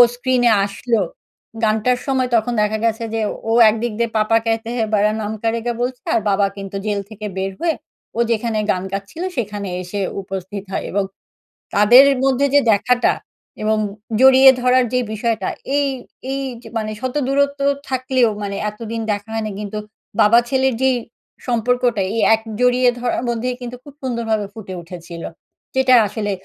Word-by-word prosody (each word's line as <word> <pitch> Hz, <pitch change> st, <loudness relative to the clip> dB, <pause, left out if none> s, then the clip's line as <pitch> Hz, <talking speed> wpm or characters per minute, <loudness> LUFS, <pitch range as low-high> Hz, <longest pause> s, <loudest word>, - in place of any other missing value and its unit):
স্ক্রিনে 245 Hz, -1 st, +2 dB
আসলো, 215 Hz, +3 st, -1 dB, 0.6 s
গানটার 220 Hz, +3 st, +2 dB
সময় 260 Hz, -2 st, +1 dB
তখন 230 Hz, +2 st, +1 dB
দেখা 210 Hz, +1 st, +1 dB
গেছে 230 Hz, 0 st, 0 dB
যে 225 Hz, -, 0 dB, 0.3 s
ও -, -, +3 dB, 0.2 s
একদিক 225 Hz, +1 st, -2 dB
দিয়ে 235 Hz, -1 st, +1 dB
'পাপা 215 Hz, +1 st, +3 dB
কেহতেহে 225 Hz, +1 st, -1 dB
বারা 210 Hz, +1 st, +3 dB
নাম 210 Hz, 0 st, -3 dB
কারেগা' 230 Hz, +1 st, -1 dB
বলছে 250 Hz, 0 st, -2 dB
আর -, -, +2 dB
বাবা 200 Hz, 0 st, +3 dB
কিন্তু 195 Hz, 0 st, -7 dB
জেল 205 Hz, -1 st, 0 dB
থেকে 215 Hz, -1 st, -8 dB
বের 190 Hz, 0 st, -1 dB
হয়ে 335 Hz, -2 st, +1 dB, 0.4 s
ও -, -, -1 dB
যেখানে 230 Hz, 0 st, 0 dB
গান 185 Hz, -1 st, -2 dB
গাচ্ছিলো 200 Hz, -, -4 dB
সেখানে 205 Hz, -4 st, -3 dB
এসে 185 Hz, +3 st, -5 dB, 0.2 s
উপস্থিত 190 Hz, +1 st, -6 dB
হয় -, -, -2 dB
এবং 200 Hz, +1 st, +1 dB, 0.7 s
তাদের 225 Hz, +6 st, +8 dB
এ -, -, -3 dB
মধ্যে 270 Hz, +1 st, +2 dB
যে -, -, +8 dB
দেখাটা 245 Hz, +4 st, +2 dB, 0.5 s
এবং 215 Hz, 0 st, +2 dB, 0.4 s
জড়িয়ে 265 Hz, 0 st, +8 dB
ধরার 250 Hz, +1 st, +4 dB
যে 250 Hz, -, +3 dB
বিষয়টা 225 Hz, +1 st, -1 dB, 0.3 s
এই 285 Hz, -1 st, +2 dB, 0.4 s
এই 275 Hz, -, -2 dB, 0.2 s
যে -, -, -12 dB
মানে 215 Hz, -1 st, -2 dB
শত 255 Hz, 0 st, -3 dB
দূরত্ব 280 Hz, +1 st, +1 dB, 0.3 s
থাকলেও 255 Hz, -2 st, +2 dB
মানে 200 Hz, -1 st, -3 dB
এতদিন 225 Hz, +2 st, -6 dB
দেখা 205 Hz, +1 st, -4 dB
হয়নি 220 Hz, -1 st, -2 dB
কিন্তু 210 Hz, 0 st, -4 dB, 0.4 s
বাবা 220 Hz, +3 st, +6 dB
ছেলের 265 Hz, -1 st, +2 dB
যেই 260 Hz, -1 st, +3 dB, 0.5 s
সম্পর্কটা 245 Hz, -1 st, +1 dB
এই -, -, 0 dB, 0.2 s
এক 220 Hz, -, -9 dB, 0.2 s
জড়িয়ে 250 Hz, 0 st, +4 dB
ধরার 245 Hz, 0 st, -1 dB
মধ্যেই 240 Hz, +2 st, -1 dB
কিন্তু 245 Hz, 0 st, -6 dB
খুব 285 Hz, -, -13 dB
সুন্দরভাবে 230 Hz, -5 st, -1 dB
ফুটে 200 Hz, -4 st, -8 dB
উঠেছিল। 170 Hz, 0 st, -9 dB, 0.5 s
যেটা 265 Hz, -1 st, +4 dB
আসলে 205 Hz, 0 st, -3 dB
230 Hz, 160 wpm, -19 LUFS, 210-250 Hz, 0.7 s, তাদের